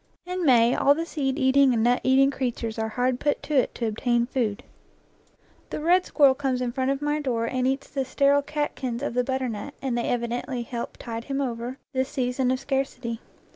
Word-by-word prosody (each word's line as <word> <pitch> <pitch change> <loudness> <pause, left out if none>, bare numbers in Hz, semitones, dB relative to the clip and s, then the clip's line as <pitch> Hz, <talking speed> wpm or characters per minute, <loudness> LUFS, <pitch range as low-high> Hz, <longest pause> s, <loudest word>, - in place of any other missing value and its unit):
In 360 0 -3
May 240 -2 +5
all 285 +1 +4
the 330 +2 -2
seed 275 -5 -2
eating 265 -2 +4
and 220 - +1
nut 245 +1 +3
eating 270 +1 +4
creatures 235 -4 -3
are 220 0 -1
hard 250 +2 0
put 290 - 0
to 305 - -4
it 265 -3 +2
to 235 - -2
obtain 235 +2 +1
food. 235 -5 -2 1.1
The - - -4
red 355 +4 +3
squirrel 280 -3 +5
comes 265 -2 -1
in 250 -1 -1
front 260 +2 -1
of 275 +1 -1
my 295 +1 0
door 235 -5 -1
and 255 +2 0
eats 270 +1 -1
the 275 -2 -2
sterile 280 +2 +3
catkins 280 -4 -3
of 285 - -2
the 250 +1 +1
butternut, 260 -1 -3
and 265 -3 -2
they 235 - -1
evi 235 -1 0
dently 245 0 -3
help 235 0 -5
tide 230 0 -6
him 275 -1 -2
over 245 -1 -3 0.2
this 260 0 0
season 250 -1 0
of 255 0 +1
scarcity. 265 -4 -2
260 Hz, 210 wpm, -25 LUFS, 240-275 Hz, 1.1 s, May